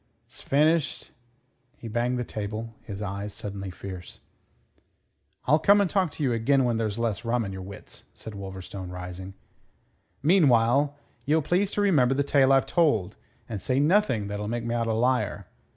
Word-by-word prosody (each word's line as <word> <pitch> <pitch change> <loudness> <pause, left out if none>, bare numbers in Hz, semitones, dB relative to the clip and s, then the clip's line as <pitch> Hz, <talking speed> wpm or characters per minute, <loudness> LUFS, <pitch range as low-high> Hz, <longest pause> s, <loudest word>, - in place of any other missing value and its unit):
'S - - -13
finished'" 155 +2 +1 0.7
He 115 - -9
banged 120 +3 0
the 125 - -1
table, 110 +1 -5
his 100 0 -7
eyes 100 +1 -5
suddenly 100 -1 -5
fierce. 90 -1 -9 1.3
"I'll 150 +4 +4
come 200 +6 +5
and 200 - +3
talk 185 -1 +1
to 155 - -4
you 130 -3 +2
again 130 +4 +2
when 120 -2 +1
there's 110 -2 -2
less 115 -1 -1
rum 115 0 0
in 95 - -5
your 95 - -6
wits," 100 +1 -10
said 110 - -8
Wolverstone, 95 -1 -7
rising. 90 +1 -7 0.9
"Meanwhile 140 -4 +4 0.3
ye'll 155 +2 +2
please 185 +6 +1
to 205 - 0
remember 140 -10 +3
the 140 - +2
tale 135 -1 +4
I've 135 -1 +4
told, 145 - +1 0.3
and 105 -4 -5
say 130 +1 +1
nothing 150 - +2
that'll 105 +1 -4
make 115 +1 -3
me 120 - -1
out 115 -1 0
a 110 - +1
liar. 125 +3 0
115 Hz, 170 wpm, -26 LUFS, 100-140 Hz, 1.3 s, come